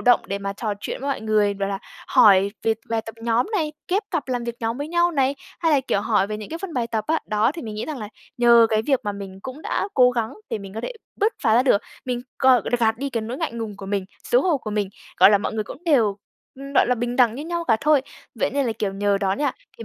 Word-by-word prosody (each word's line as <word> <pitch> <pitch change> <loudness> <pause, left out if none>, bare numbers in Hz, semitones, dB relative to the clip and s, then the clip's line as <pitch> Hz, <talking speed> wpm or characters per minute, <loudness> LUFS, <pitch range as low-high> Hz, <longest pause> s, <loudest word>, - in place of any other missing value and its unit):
động 245 0 +5
để 200 - -3
mà 200 0 -3
trò 210 0 -3
chuyện - - -5
với 280 - -3
mọi 270 - -2
người, 210 -2 +2
bảo 195 0 -2
là, 195 -1 -2 0.3
hỏi 200 -1 +6
về 225 0 +2 0.2
bài 225 - +1
tập 225 - -7
nhóm 235 +4 +2
này, 310 -7 0 0.2
ghép 395 +4 +1
cặp 325 -7 -2
làm 245 -2 -1
việc 235 -1 -4
nhóm 230 +3 -2
với 290 - -4
nhau 345 +1 +2
này, 275 -3 +1 0.3
hay 325 -2 +3
là, 280 - +4
kiểu, 200 - 0
hỏi 205 -2 +2
về 215 0 -4
những 210 -1 -8
cái 330 - -5
phần 375 -3 -6
bài 240 -2 0
tập 220 -2 -2
á. 320 - +2
Đó, 215 +5 +2
thì 330 - -6
mình 215 -2 -6
nghĩ 215 - -3
rằng 300 -4 -5
là 210 -2 -6 0.3
nhờ 235 -1 +7
cái 215 0 +2
việc 270 +1 +1
mà 205 - -1
mình 195 -1 -8
cũng 265 +4 -8
đã - - -1
cố 250 -1 +6
gắng 230 -2 -2 0.2
để - - -1
mình 195 0 -10
có 225 - -3
thể - - -4 0.2
bứt 430 +2 +2
phá 220 -3 +4
ra 245 - +5
được, 210 -6 +3 0.2
mình 250 -1 -2 0.2
còn 255 -5 +5 0.2
gạt 225 0 +2
đi 280 0 -3
cái 230 - -1
nỗi 230 +4 -5
ngại 320 -7 -2
ngùng 225 -3 -5
của 195 - -9
mình, 195 -1 -1 0.2
xấu - - +3
hổ 350 -5 +2
của 215 - -6
mình, 205 -2 -1 0.3
gọi - - +9
là, 205 - +5
mọi 205 - -3
người 215 -1 -2
cũng 325 - -11
đều, 230 -11 +3 0.4
ừm, 275 +1 -8
gọi - - +5
là, 250 - +2
bình 240 +1 -3
đẳng 240 -3 +4
như 290 +4 -6
nhau 340 0 -3
cả 225 -6 +3
thôi. 300 -2 +4 0.3
Vậy - - 0
nên 280 -2 0
là, 225 - 0
kiểu, 200 -3 -2
nhờ 200 0 +1
đó 195 -1 +1
nha, 285 +5 0 0.3
thì 230 - -7
235 Hz, 285 wpm, -23 LUFS, 210-275 Hz, 0.4 s, gọi